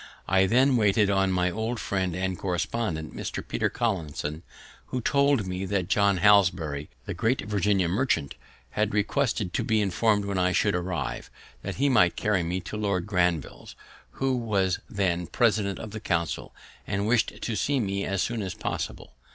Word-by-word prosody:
I 95 +1 +4
then 130 +4 +4
waited 105 -1 +3
on 95 -1 +2
my 90 -1 +1
old 110 +4 -3
friend 95 -3 -1
and 95 0 -1
correspondent, 90 -2 -2
Mr. - - -5
Peter - - 0
Collinson, 80 - -2 0.5
who 130 - -3
told 140 -2 +2
me 90 +1 -3
that 95 -2 -1
John 100 -1 +3
Hanbury, 90 -7 +3 0.2
the - - -4
great 120 +4 0
Virginia 100 -3 +1
merchant, 90 - 0 0.4
had 105 +4 0
requested 110 -2 0
to - - 0
be 110 -3 +2
informed 105 +1 +2
when 100 -2 -1
I 90 0 +2
should 105 0 +2
arrive, 90 -6 -3 0.3
that - - -5
he 140 - +2
might 90 -10 +4
carry 105 -4 +1
me 90 +2 -2
to 105 - -6
Lord 100 -4 -1
Granville's, 90 -7 -1 0.4
who 135 -1 0
was 100 -6 0
then 90 -3 0
President 105 -4 +1
of 110 - -7
the 110 - -5
Council 85 -6 -2 0.4
and 100 +1 -1
wished 115 0 +1
to 115 - -3
see 140 +5 +1
me 100 -3 -1
as 100 -1 0
soon 120 -2 -2
as 95 -2 -4
possible. - - -5
100 Hz, 170 wpm, -27 LUFS, 90-110 Hz, 0.5 s, I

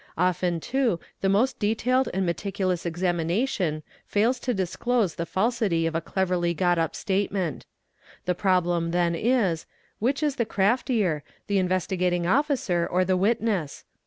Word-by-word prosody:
Often 180 0 +1
_ - - -19
too 250 -9 +1 0.2
the 195 - +2
most 240 +7 +2
detailed 245 +5 +1
and 190 +1 0
meticulous 185 0 -1
examination 175 - -1 0.2
fails 230 +5 +2
to 250 - -1
disclose 200 0 0
the 170 - -4
falsity 205 -5 +1
of 165 - -1
a 165 - 0
cleverly 175 -1 0
got 175 0 +2
up 165 -1 -1
statement; 195 -3 -2 0.6
the 180 - +1
problem 175 -3 +1
then 170 0 +1
is, 195 -4 +1 0.3
which 270 +7 0
is 290 -2 0
the 235 - +1
_ - - -24
craftier, 205 - +1 0.2
the 200 -1 +1
Investigating 180 -1 0
Officer 235 - +1
or 185 +1 +2
the 185 0 +2
witness? 200 -5 0
185 Hz, 150 wpm, -26 LUFS, 175-225 Hz, 0.6 s, the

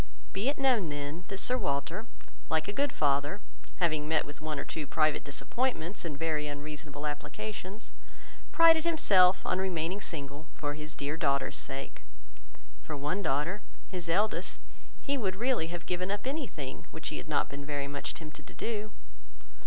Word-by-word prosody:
Be 205 +7 +2
it 290 - 0
known 250 - +4
then, 145 +4 -4
that 195 -2 -4
Sir 250 +5 +4
Walter, 165 - -1 0.4
like 160 -1 +2
a 205 - -2
good 285 +2 +2
father, 145 +6 +2 0.4
(having 155 -4 +2
met 160 0 +3
with 145 +1 -9
one 155 -1 -2
or - - -3
two 150 -3 -4
private 155 0 +3
disappointments 180 - -1
in 155 -4 -3
very 155 -1 0
unreasonable 150 0 -5
applications), 205 +7 -5 0.6
prided 330 -1 +7
himself 195 - +6
on 185 - +2
remaining 185 +1 0
single 145 -3 -4
for 145 -1 -2
his 155 +1 -4
dear 145 +3 -2
daughters' 140 -3 +2
sake. 135 0 -4 0.8
For 155 - -4
one 150 +8 0
daughter, 160 +5 +1 0.3
his 180 -3 -4
eldest, 205 +6 +2 0.4
he 280 -1 +1
would 190 -5 0
really 240 -5 +2
have 175 0 -5
given 180 +1 -1
up 205 +3 -1
any 280 +1 -1
thing, 135 -8 -6
which - - -4
he - - -3
had - - -7
not - - +3
been 140 0 -6
very 145 -1 -2
much 140 0 -3
tempted 155 -2 -9
to - - -11
do. 215 -2 -2
165 Hz, 170 wpm, -31 LUFS, 145-205 Hz, 0.8 s, prided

